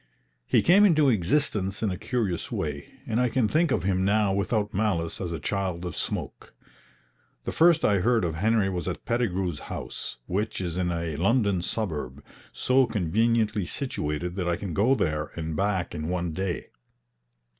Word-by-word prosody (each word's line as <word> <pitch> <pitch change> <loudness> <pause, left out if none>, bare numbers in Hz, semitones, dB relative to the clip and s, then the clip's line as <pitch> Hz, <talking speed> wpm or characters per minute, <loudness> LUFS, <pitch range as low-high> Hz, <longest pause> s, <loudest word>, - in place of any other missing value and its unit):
He - - +3
came 195 +4 +6
into 155 -8 +5
existence 105 - +1
in 105 - +1
a - - -2
curious 100 -4 -2
way, 75 -2 -4
and 110 +3 0
I 125 - +2
can 115 -1 +2
think 160 +7 +2
of - - 0
him 95 0 +1
now 100 0 +2
without 105 +1 0
malice 95 -6 0
as 90 -3 -3
a 80 - -3
child 90 0 -2
of 90 -3 -5
smoke. - - -4 0.9
The - - -3
first 170 0 +4
I 100 -2 +3
heard 115 0 +2
of 80 - -1
Henry 105 +4 +2
was 90 -4 -3
at - - -4
Pettigrew's 95 -9 -1
house, - - -5
which 105 +4 -2
is 85 -3 -3
in 90 -1 0
a 85 -2 -2
London 100 - +2
suburb, 75 - -3 0.3
so 130 0 +2
conveniently 110 +1 +1
situated 85 - -3
that 90 -2 -1
I 85 - +2
can 95 -1 -5
go 115 - +3
there 75 - -1
and 80 -1 -4
back 95 -1 0
in 75 -1 -4
one 90 -2 -2
day. 95 0 -3
95 Hz, 175 wpm, -26 LUFS, 85-110 Hz, 0.9 s, came